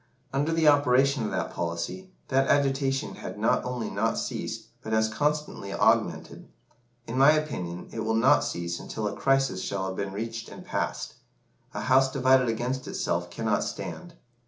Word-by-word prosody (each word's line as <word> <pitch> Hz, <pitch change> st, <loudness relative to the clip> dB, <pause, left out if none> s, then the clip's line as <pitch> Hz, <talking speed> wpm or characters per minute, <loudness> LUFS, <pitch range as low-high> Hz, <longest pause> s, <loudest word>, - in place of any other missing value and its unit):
Under 145 Hz, +4 st, +1 dB
the 165 Hz, -1 st, +2 dB
operation 140 Hz, -2 st, +4 dB
of 105 Hz, -, -1 dB
that -, -, -2 dB
policy, 85 Hz, -, -4 dB, 0.2 s
that 135 Hz, +1 st, +3 dB
agitation 135 Hz, -1 st, +1 dB
had -, -, -7 dB
not -, -, +2 dB
only 125 Hz, -2 st, -3 dB
not 110 Hz, +3 st, 0 dB
ceased, -, -, -4 dB
but 110 Hz, -, -4 dB
has 110 Hz, 0 st, +3 dB
constantly 150 Hz, -7 st, -1 dB
augmented. -, -, +1 dB, 0.6 s
In 125 Hz, +3 st, -3 dB
my 140 Hz, +3 st, +8 dB
opinion, 90 Hz, -, -3 dB
it 115 Hz, -, -6 dB
will 110 Hz, 0 st, 0 dB
not 115 Hz, -, +5 dB
cease 85 Hz, 0 st, -3 dB
until 110 Hz, -1 st, -4 dB
a 100 Hz, -, -4 dB
crisis 135 Hz, -8 st, +1 dB
shall 95 Hz, -1 st, -2 dB
have 95 Hz, 0 st, -3 dB
been 100 Hz, 0 st, -3 dB
reached 115 Hz, +3 st, -5 dB
and -, -, -11 dB
passed. -, -, -3 dB, 0.6 s
'A -, -, -2 dB
house 130 Hz, +1 st, +4 dB
divided 130 Hz, -2 st, +4 dB
against 125 Hz, +3 st, -2 dB
itself -, -, -2 dB
cannot -, -, 0 dB
stand. 175 Hz, -2 st, -6 dB
125 Hz, 165 wpm, -27 LUFS, 110-140 Hz, 0.6 s, my